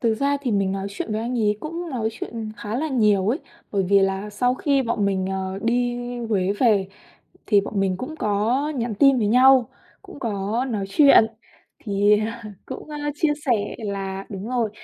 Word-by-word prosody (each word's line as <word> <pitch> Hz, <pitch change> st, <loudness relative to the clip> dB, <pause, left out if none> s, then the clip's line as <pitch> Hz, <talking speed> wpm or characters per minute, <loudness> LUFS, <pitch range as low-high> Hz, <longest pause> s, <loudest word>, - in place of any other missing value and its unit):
Thực 230 Hz, -2 st, +2 dB
ra 280 Hz, +5 st, +1 dB
thì 255 Hz, -5 st, -1 dB
mình 195 Hz, -2 st, +1 dB
nói 195 Hz, 0 st, -3 dB
chuyện 205 Hz, +2 st, -5 dB
với 215 Hz, -, -1 dB
anh 240 Hz, +2 st, -2 dB
ấy 210 Hz, -2 st, +2 dB
cũng 335 Hz, +2 st, -5 dB
nói 235 Hz, -5 st, -1 dB
chuyện 225 Hz, -1 st, -6 dB
khá 210 Hz, +2 st, -4 dB
là 310 Hz, +4 st, -1 dB
nhiều 210 Hz, -7 st, +2 dB
ấy, 255 Hz, +7 st, +1 dB, 0.3 s
bởi 200 Hz, -2 st, +1 dB
vì 200 Hz, 0 st, +5 dB
là 195 Hz, +2 st, -1 dB
sau 245 Hz, +4 st, +1 dB
khi 275 Hz, 0 st, +1 dB
bọn 230 Hz, -4 st, -1 dB
mình, 190 Hz, -1 st, 0 dB
ờ, 190 Hz, 0 st, -3 dB
đi 245 Hz, +1 st, +1 dB, 0.2 s
Huế 200 Hz, -5 st, 0 dB
về 205 Hz, -3 st, +2 dB, 0.6 s
thì 205 Hz, -2 st, +4 dB
bọn 200 Hz, 0 st, -3 dB
mình 190 Hz, -2 st, +1 dB
cũng 280 Hz, +9 st, -6 dB
có 225 Hz, +6 st, 0 dB
nhắn 235 Hz, -3 st, -2 dB
tin 275 Hz, +4 st, +5 dB
với 215 Hz, -, +1 dB
nhau, 255 Hz, +2 st, +5 dB, 0.3 s
cũng 385 Hz, -6 st, -12 dB
có 215 Hz, +1 st, -1 dB
nói 210 Hz, -4 st, -2 dB
chuyện 275 Hz, +1 st, +6 dB, 0.6 s
thì, 205 Hz, 0 st, +3 dB
à, 225 Hz, +2 st, -4 dB, 0.2 s
cũng, 265 Hz, +3 st, -8 dB
a, 295 Hz, 0 st, -3 dB
chia 300 Hz, 0 st, +1 dB
sẻ 215 Hz, -5 st, 0 dB
là 195 Hz, -3 st, -4 dB
đúng 200 Hz, +1 st, -6 dB
rồi. 240 Hz, -4 st, 0 dB
220 Hz, 200 wpm, -23 LUFS, 200-255 Hz, 0.6 s, chuyện